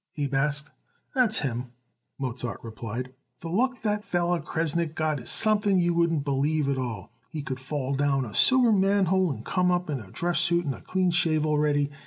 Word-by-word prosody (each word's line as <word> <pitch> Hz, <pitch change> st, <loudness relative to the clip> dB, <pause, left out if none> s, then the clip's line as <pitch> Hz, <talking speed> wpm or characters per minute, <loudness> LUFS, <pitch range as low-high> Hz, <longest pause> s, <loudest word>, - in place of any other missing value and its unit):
Abe 140 Hz, -2 st, -2 dB
asked. 150 Hz, +2 st, -1 dB, 0.4 s
"That's 245 Hz, -5 st, +3 dB
him," 125 Hz, -2 st, -4 dB, 0.4 s
Mozart 125 Hz, -2 st, -4 dB
replied. 115 Hz, +3 st, -6 dB, 0.3 s
"The 165 Hz, -, -6 dB
luck 250 Hz, +8 st, 0 dB
that 210 Hz, -1 st, 0 dB
feller 175 Hz, -2 st, 0 dB
Kresnick 165 Hz, 0 st, -2 dB
got 155 Hz, -2 st, 0 dB
it 120 Hz, -, -11 dB
is -, -, -2 dB
something 205 Hz, -3 st, +3 dB
you 175 Hz, -1 st, +2 dB
wouldn't 165 Hz, -4 st, +1 dB
believe 145 Hz, +2 st, 0 dB
at 140 Hz, -1 st, 0 dB
all. 115 Hz, -6 st, -5 dB, 0.2 s
He 155 Hz, -2 st, -5 dB
could 130 Hz, -3 st, -5 dB
fall 135 Hz, 0 st, -3 dB
down 135 Hz, -1 st, +1 dB
a 110 Hz, -, -9 dB
sewer 255 Hz, -, +5 dB
manhole 190 Hz, -3 st, +2 dB
and 115 Hz, -4 st, -7 dB
come 180 Hz, -1 st, +1 dB
up 180 Hz, -2 st, 0 dB
in 140 Hz, -, -2 dB
a 100 Hz, -5 st, -11 dB
dress 175 Hz, -, 0 dB
suit 170 Hz, 0 st, +3 dB
and 140 Hz, -, -1 dB
a -, -, -11 dB
clean 185 Hz, -1 st, 0 dB
shave 155 Hz, -3 st, +2 dB
already. 150 Hz, -1 st, +1 dB
155 Hz, 195 wpm, -26 LUFS, 135-180 Hz, 0.4 s, sewer